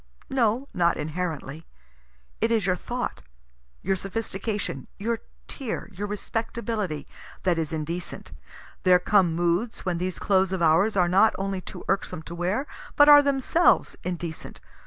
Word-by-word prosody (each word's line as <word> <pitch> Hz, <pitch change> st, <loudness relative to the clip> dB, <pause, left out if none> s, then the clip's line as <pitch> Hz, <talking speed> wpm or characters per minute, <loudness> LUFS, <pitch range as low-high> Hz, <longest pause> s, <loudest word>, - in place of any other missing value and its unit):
No, 250 Hz, 0 st, +1 dB
not 170 Hz, -1 st, +2 dB
inherently. 155 Hz, -1 st, -4 dB, 0.7 s
It 225 Hz, -, +3 dB
is 225 Hz, -4 st, +2 dB
your 180 Hz, -1 st, +2 dB
thought, 245 Hz, -, -4 dB, 0.6 s
your 195 Hz, +2 st, +1 dB
sophistication, 195 Hz, -, -4 dB
your 225 Hz, +3 st, -1 dB, 0.3 s
tear, 250 Hz, -6 st, -5 dB
your 200 Hz, +3 st, -4 dB
respectability, 210 Hz, -5 st, -3 dB, 0.4 s
that 175 Hz, -3 st, +2 dB
is 160 Hz, -1 st, -2 dB
indecent. 165 Hz, +3 st, -5 dB, 0.5 s
There 185 Hz, -2 st, +6 dB
come 180 Hz, -2 st, +3 dB
moods 175 Hz, +7 st, 0 dB
when 175 Hz, -2 st, -1 dB
these 180 Hz, 0 st, -2 dB
clothes 190 Hz, -1 st, +2 dB
of 185 Hz, -, -2 dB
ours 175 Hz, +7 st, +4 dB
are 180 Hz, -1 st, +4 dB
not 195 Hz, +5 st, +4 dB
only 195 Hz, -1 st, -2 dB
too -, -, -9 dB
irksome 195 Hz, -4 st, -1 dB
to 170 Hz, -, -8 dB
wear, 185 Hz, +10 st, -1 dB, 0.3 s
but 290 Hz, 0 st, +7 dB
are 290 Hz, 0 st, +10 dB
themselves 280 Hz, +5 st, +2 dB
indecent. 170 Hz, -2 st, -5 dB
190 Hz, 140 wpm, -26 LUFS, 170-220 Hz, 0.7 s, are